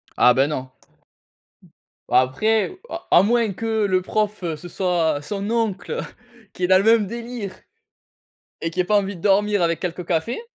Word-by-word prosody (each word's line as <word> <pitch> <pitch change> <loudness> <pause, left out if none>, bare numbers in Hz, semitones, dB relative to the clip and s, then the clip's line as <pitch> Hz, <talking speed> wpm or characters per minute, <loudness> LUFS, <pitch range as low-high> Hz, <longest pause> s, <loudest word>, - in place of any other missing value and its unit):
Ah, 125 - +6
beh, 135 +2 +3
non. 130 -3 -5 1.4
Après, 215 - +2
à - - -7
à - - +7
moins 230 -2 +2
que 220 0 -1
le 185 -1 +2
prof, 210 0 -2
heu, 165 -2 -2
ce 175 +4 -10
soit 165 -5 0
son 200 +6 -4
oncle, 225 -4 -1
heu, - - -2 0.5
qui 180 - -6
est - - +3
dans 185 0 +6
le 195 - +2
même 225 -2 +4
délire 235 -3 -6 1.1
et 165 - -2
qui 180 +2 -2
ait - - +2
pas 210 +2 +3
envie 200 -1 -3
de - - -13
dormir, 205 -1 +2
avec 170 -1 0
quelques 180 -1 -4
cafés. 180 - -1
195 Hz, 180 wpm, -22 LUFS, 170-215 Hz, 1.4 s, à